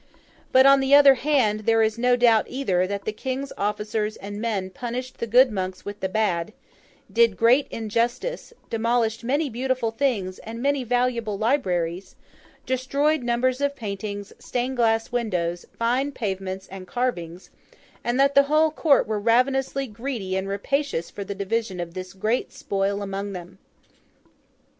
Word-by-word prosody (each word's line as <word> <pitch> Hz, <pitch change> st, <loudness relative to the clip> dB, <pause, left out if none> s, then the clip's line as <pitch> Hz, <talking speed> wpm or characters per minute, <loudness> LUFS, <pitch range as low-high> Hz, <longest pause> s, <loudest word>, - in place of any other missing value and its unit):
But, 260 Hz, +1 st, +6 dB
on 275 Hz, 0 st, +7 dB
the 270 Hz, +1 st, +5 dB
other 285 Hz, -1 st, +8 dB
hand, 255 Hz, -6 st, +1 dB
there 225 Hz, 0 st, +4 dB
is 220 Hz, +1 st, 0 dB
no 245 Hz, +1 st, +4 dB
doubt 235 Hz, -3 st, +4 dB
either, 190 Hz, -9 st, 0 dB
that 200 Hz, 0 st, -4 dB
the -, -, -1 dB
King's 265 Hz, +5 st, -4 dB
officers 210 Hz, +1 st, -2 dB
and 205 Hz, +1 st, -7 dB
men 200 Hz, -5 st, -2 dB
punished 250 Hz, +5 st, -5 dB
the 235 Hz, -, -2 dB
good 250 Hz, +3 st, +5 dB
monks 185 Hz, -2 st, -4 dB
with 205 Hz, 0 st, -6 dB
the 190 Hz, -, -2 dB
bad; 200 Hz, -2 st, 0 dB, 0.6 s
did 230 Hz, -4 st, +4 dB
great 245 Hz, +5 st, +4 dB
injustice; 235 Hz, -, -2 dB, 0.2 s
demolished 230 Hz, 0 st, 0 dB
many 285 Hz, +6 st, 0 dB
beautiful 255 Hz, -1 st, -1 dB
things 220 Hz, -7 st, -1 dB
and 230 Hz, +1 st, -8 dB
many 280 Hz, +1 st, +1 dB
valuable 240 Hz, -3 st, 0 dB
libraries; 185 Hz, -, -1 dB, 0.5 s
destroyed 275 Hz, +4 st, +1 dB
numbers 250 Hz, +2 st, 0 dB
of 285 Hz, 0 st, 0 dB
paintings, 205 Hz, -3 st, -5 dB
stained 250 Hz, +1 st, -3 dB
glass 225 Hz, -1 st, +2 dB
windows, 180 Hz, -8 st, -2 dB
fine 250 Hz, +5 st, +1 dB
pavements, 190 Hz, -5 st, -4 dB
and 190 Hz, -1 st, -9 dB
carvings; 180 Hz, -7 st, -3 dB, 0.5 s
and 240 Hz, +2 st, 0 dB
that 275 Hz, +1 st, +4 dB
the 280 Hz, -, +7 dB
whole 310 Hz, +1 st, +4 dB
court 300 Hz, -2 st, +3 dB
were 215 Hz, 0 st, -2 dB
ravenously 265 Hz, +5 st, +1 dB
greedy 225 Hz, -4 st, -4 dB
and 190 Hz, 0 st, -2 dB
rapacious 200 Hz, -, -2 dB
for 205 Hz, -, -6 dB
the 200 Hz, +1 st, -6 dB
division 200 Hz, -1 st, -2 dB
of 170 Hz, -1 st, -5 dB
this 185 Hz, 0 st, -7 dB
great 215 Hz, +6 st, -1 dB
spoil 200 Hz, +1 st, -2 dB
among 200 Hz, 0 st, -4 dB
them. 180 Hz, +1 st, -9 dB
230 Hz, 155 wpm, -24 LUFS, 200-255 Hz, 0.6 s, other